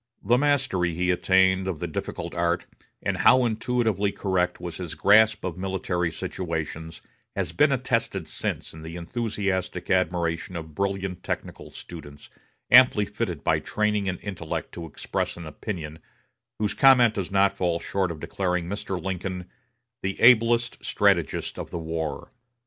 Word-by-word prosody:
The 115 +5 +4
mastery 130 - +1
he 90 +1 +1
attained 95 +1 +3
of 95 -4 -2
the - - -3
difficult - - -5
art, 85 0 0 0.4
and - - -1
how 130 -1 +5
intuitively 110 -3 0
correct 90 -3 -1
was 85 -2 -6
his 90 -4 -6
grasp 110 +1 +5
of 90 -1 -4
military 90 -2 -1
situations, 80 -2 -5 0.3
has - - -1
been 150 0 +3
attested 130 -3 -1
since - - -4
in 80 - -11
the 80 +1 -8
enthusiastic 95 -2 -2
admiration 90 -1 0
of 80 -2 -7
brilliant 95 0 -2
technical - - -5
students, 75 -4 -11 0.4
amply 125 -4 +7
fitted 100 -7 -4
by - - +2
training 105 -2 0
and 90 - -4
intellect 90 -6 -5
to 85 -1 -7
express 80 - -3
an 85 - -8
opinion, 80 -1 -6 0.6
whose 105 -2 0
comment 125 -4 +6
does 100 -4 -3
not 100 0 +3
fall 85 -2 0
short 95 0 -1
of 80 -2 -6
declaring 90 0 -2
Mr. 95 -1 -4
Lincoln 90 0 -4 0.5
"the 95 +1 -3
ablest 120 0 +4
strategist - - +1
of - - -6
the - - -5
war." 80 -1 -4
95 Hz, 150 wpm, -25 LUFS, 85-105 Hz, 0.6 s, amply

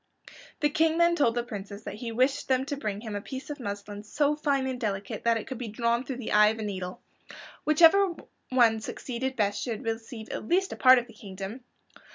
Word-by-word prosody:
The 295 - +3
King 320 +1 +2
then 340 0 +4
told 240 -7 +2
the 240 - 0
princes 205 -3 -8
that - - -6
he 230 +2 -6
wished 260 +5 +1
them 260 0 +2
to 285 - -3
bring 210 -7 -4
him 220 -3 -6
a 205 - -3
piece 265 +6 -7
of 290 - -6
muslin 205 -2 -6
so 290 +7 +1
fine 285 -3 0
and 260 -1 -3
delicate 200 -2 -3
that 230 -1 +4
it 225 - -5
could 260 -2 -6
be 245 - -4
drawn 235 +3 0
through 265 -1 -5
the 250 - -5
eye 210 0 +6
of 220 +1 0
a 220 - -4
needle. 185 -3 -5 0.7
Whichever 340 +4 +5 0.3
one 235 -3 +4
succeeded 255 +3 -4
best 205 -3 0
should 235 0 -4
receive 225 0 -5
at - - -5
least 380 +2 +1
a - - -6
part 255 0 +7
of 240 - 0
the 235 - -16
kingdom. 200 +3 -8
235 Hz, 220 wpm, -28 LUFS, 210-270 Hz, 0.7 s, part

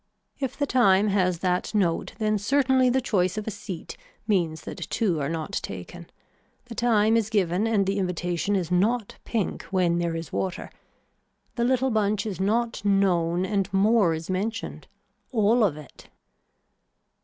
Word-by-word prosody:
If 265 -3 -3
the 285 - +1
time 210 -6 +4
has 185 -3 +1
that 180 +4 0
note 175 -5 0
then 215 -1 0
certainly 260 +3 +3
the 260 +2 +2
choice 185 -5 0
of 215 - -3
a 220 - -3
seat 185 -4 -8 0.3
means 175 -7 0
that - - -7
two 190 -9 0
are 140 - -1
not 160 -1 -4
taken. 100 - -8 0.6
The 245 - -9
time 225 -2 +3
is 225 -2 +1
given 200 -1 +1
and 210 -3 +2
the 195 +1 0
invitation 180 +1 -1
is 180 -3 -2
not 210 +5 0
pink 220 -5 -2
when 180 -3 +1
there 170 -1 -1
is 165 -1 -6
water. 185 -1 -3 0.8
The 235 -1 0
little 260 +1 +2
bunch 210 -1 +1
is 200 -4 -4
not 230 +3 0
known 185 -3 +2
and 195 0 -1
more 195 -3 +3
is 160 +1 -7
mentioned. 205 +5 -3 0.4
All 225 0 +3
of 170 -8 +1
it. 150 - -14
200 Hz, 160 wpm, -25 LUFS, 180-225 Hz, 0.8 s, time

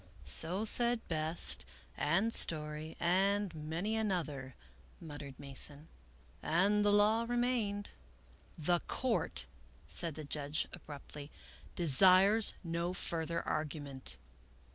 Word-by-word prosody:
" - - -17 0.2
So 185 +6 -1
said 235 +1 +4
Best, 160 0 -1 0.3
and 190 +10 +1
Story, 155 0 0
and 195 +2 +1
many 165 +7 -3
another," 155 - -2 0.4
muttered 145 -4 -9
Mason, 145 +2 -2 0.3
" - - -29 0.2
and 205 +2 +3
the 205 - +4
law 210 +2 +4
remained." 240 -5 -1 0.4
" 65 +1 -27
The 175 -1 +4
Court," 255 -4 +1 0.4
said 165 -4 -4
the 155 - -7
judge, 145 +1 -3
abruptly, 145 -3 -10 0.3
" - - -22
desires 185 - +5
no 170 +1 -2
fur 165 -3 -2
ther 170 0 -2
argument." 145 - -1
170 Hz, 120 wpm, -34 LUFS, 150-205 Hz, 0.4 s, desires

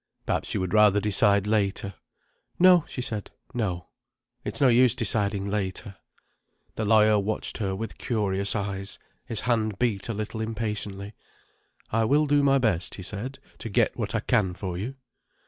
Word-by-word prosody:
"Perhaps - - -1
you - - +1
would 95 -1 -3
rather 105 -2 +5
decide 100 0 +3
later." 100 -2 0 0.6
"No," 180 -2 +6
she 125 - -5
said. 110 -4 -4 0.2
"No. 90 -8 -3 0.5
It's - - -4
no 140 - +5
use 125 0 +5
deciding 100 -4 0
later." 100 -1 -3 0.8
The 110 - -2
lawyer 105 0 +5
watched 105 +4 -3
her 95 -3 -1
with 110 +1 -6
curious 100 -3 0
eyes, 100 -1 -3 0.3
his 115 -4 -1
hand 110 -4 0
beat 115 -3 -1
a - - 0
little 110 +1 -4
impatiently. 105 -2 -4 0.8
"I 115 +1 +2
will 145 +6 +3
do 145 0 +3
my 140 -1 +4
best," 105 -9 0
he 95 - -8
said, 110 +8 -5 0.2
"to 115 - -6
get 115 +1 +2
what 110 -2 -3
I 110 - +1
can 100 -8 +1
for 95 -2 -4
you." 110 +9 -4
105 Hz, 165 wpm, -26 LUFS, 100-115 Hz, 0.8 s, No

